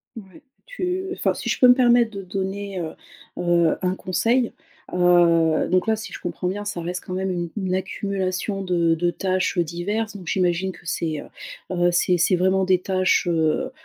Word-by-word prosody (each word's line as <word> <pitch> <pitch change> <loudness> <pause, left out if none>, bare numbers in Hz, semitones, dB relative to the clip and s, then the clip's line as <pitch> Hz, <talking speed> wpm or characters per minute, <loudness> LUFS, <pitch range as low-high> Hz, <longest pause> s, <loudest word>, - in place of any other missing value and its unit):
Ouais, 210 +5 -12 0.2
tu 375 -5 -3
enfin, - - 0
si - - -5
je - - 0
peux 250 - +7
me 245 - +9
permettre 240 -2 +4
de 200 -1 -7
donner, 195 +1 -4
heu 160 -2 -4 0.4
heu, 170 -2 +2
un 180 0 +1
conseil, 230 +7 0 0.4
heu, 170 -3 +4
donc 185 0 +2
là, 220 - +3
si 220 - -8
je - - -7
comprends 180 +1 -4
bien, 205 +3 -3
ça 205 -4 -4
reste 175 +1 -4
quand 185 - -6
même 190 +1 -2
une 175 -2 -2
une 185 -2 -1
accumulation 195 +1 -2
de 170 -3 +2
de 175 +1 0
tâches, 185 0 -1
heu, 175 - +4
diverses. 205 +6 -3
Donc 180 - -12
j'imagine 180 +1 0
que 180 - -17
c'est, 160 -3 -2
heu - - -11 0.5
heu, 175 0 +3
c'est 175 +1 +2
c'est 175 +2 +3
vraiment 190 +2 +2
des 185 -1 +3
tâches, 185 -1 +1
heu 160 -2 +1
185 Hz, 195 wpm, -23 LUFS, 175-200 Hz, 0.5 s, me